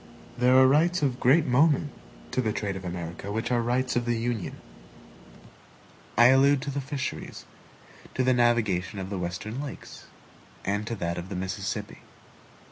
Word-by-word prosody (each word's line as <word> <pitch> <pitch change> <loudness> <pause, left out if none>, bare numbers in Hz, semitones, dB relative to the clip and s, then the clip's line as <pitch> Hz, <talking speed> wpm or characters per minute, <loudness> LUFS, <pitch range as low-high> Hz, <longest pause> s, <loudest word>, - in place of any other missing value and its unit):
There 125 +1 +4
are 130 - +7
rights 160 +5 +3
of 130 -3 0
great 145 +6 +4
moment 145 +3 +3 0.4
to 130 - +1
the 110 -3 0
trade 105 -2 -3
of 95 - -7
America 85 +2 -6
which 110 +4 -2
are 120 -1 +2
rights 125 +2 0
of 120 -1 0
the 120 -1 0
Union 115 -4 -3 1.6
I 120 +1 +8
allude 135 +2 +5
to 140 - -3
the 140 +1 -3
fisheries, 135 0 -5 0.7
to 130 - +1
the 130 0 +3
navigation 115 -6 +1
of 95 0 -5
the 100 - -3
Western 90 +8 -4
lakes, 145 - -9 0.6
and 105 +2 -1
to 115 - -2
that 85 -3 -3
of 90 +2 -8
the 100 - -5
Mississippi. 95 +1 -4
120 Hz, 165 wpm, -27 LUFS, 100-130 Hz, 1.6 s, I